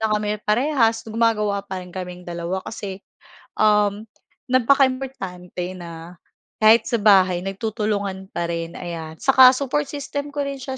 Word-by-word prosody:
na 220 -1 0
kami 210 0 -2
parehas, 230 0 +2
gumagawa 215 -3 0
pa 190 -2 -5
rin - - -13
kaming 180 -1 -7
dalawa. 175 +2 -4
Kasi, 200 -3 -7 0.5
um, 210 0 +2 0.4
napaka-importante 255 -9 0
na 170 -1 -9 0.5
kahit 220 +1 +6
sa 235 -3 -1
bahay 185 -4 +5
nagtutulungan 200 -1 -3
pa 170 0 -3
rin, 170 0 -4
ayan. 165 -2 -7
Saka 260 -1 +7
support 280 +1 -1
system 285 0 -5
ko 285 0 -3
rin 275 -1 -5
siya 265 0 -5
210 Hz, 140 wpm, -22 LUFS, 180-250 Hz, 0.5 s, Saka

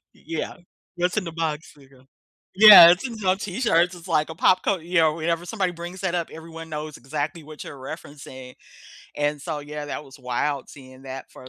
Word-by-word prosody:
Y - - -23
yeah. 165 0 -4 0.4
"What's 180 +4 -1
in 210 - +1
the 165 - -6
box?" 160 -2 -4
like 135 -1 -20
a 130 0 -21 0.5
Yeah, 195 -5 +11
it's 195 +9 0
in 230 -2 -8
some 190 -2 +1
T-shirts. 180 -4 +1
It's 175 +1 -13
like 155 -2 +1
a 160 - -7
pop 185 +1 +3
cul 190 -5 0
you 175 +3 -7
know, 155 -1 +3
whenever 165 +1 -2
somebody 190 -3 -2
brings 175 +3 -8
that 180 -2 -1
up, 170 -2 -2
everyone 165 0 -10
knows 150 -1 -6
exactly 150 +5 -5
what 155 0 -10
you're 145 - -10
referencing. 130 -2 -10 0.6
And, 145 0 -1
so, 155 -4 -4
yeah, 150 0 -7
that 150 - -6
was 135 +1 -15
wild 130 +3 -2
seeing 130 -2 -14
that 135 0 -8
for 130 - -13
160 Hz, 210 wpm, -23 LUFS, 145-175 Hz, 0.6 s, Yeah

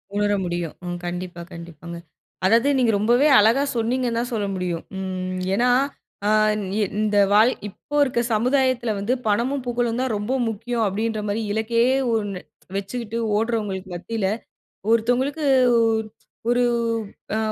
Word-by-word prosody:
உணர 205 0 +2
முடியும். 175 -2 -3
ம். 175 0 -3
கண்டிப்பா 175 0 -5
கண்டிப்பாங்க. 170 0 -9 0.5
அதாவது 230 +7 +4
நீங்க 245 -3 +3
ரொம்பவே 240 +7 +4
அழகா 225 +6 +4
சொன்னீங்கன்னு 235 +1 0
தான் 245 +1 -3
சொல்ல 210 -3 -1
முடியும். 180 -2 -3 0.2
ம் 185 -1 -3 0.2
ஏன்னா 245 +4 +2 0.6
ஆ - - +3 0.2
இந் 210 -1 -3 0.4
இந்த 210 -1 +1
வாழ் 215 +4 +6 0.2
இப்போ 290 +8 -9
இருக்க 260 -4 0
சமுதாயத்துல 250 +1 +2
வந்து 205 +5 0
பணமும் 245 +6 0
புகழும் 240 -1 -1
தான் 260 -3 -1
ரொம்ப 210 +5 -2
முக்கியம் 225 +2 -2
அப்டின்ற 215 +2 -1
மாரி, 205 +2 -1
இலக்கே 220 +2 +1 0.3
ஒன்னு 205 -4 -2 0.4
வச்சுட்டு 225 +3 -4 0.2
ஓடுறவங்களுக்கு 210 -4 -2
மத்தியில 205 +3 -2 0.6
ஒருத்தவங்களுக்கு 245 +7 +1 0.3
உ - - +4 0.7
ஒரு 245 +1 +3 0.7
அ - - +1
220 Hz, 135 wpm, -23 LUFS, 195-240 Hz, 0.7 s, வாழ்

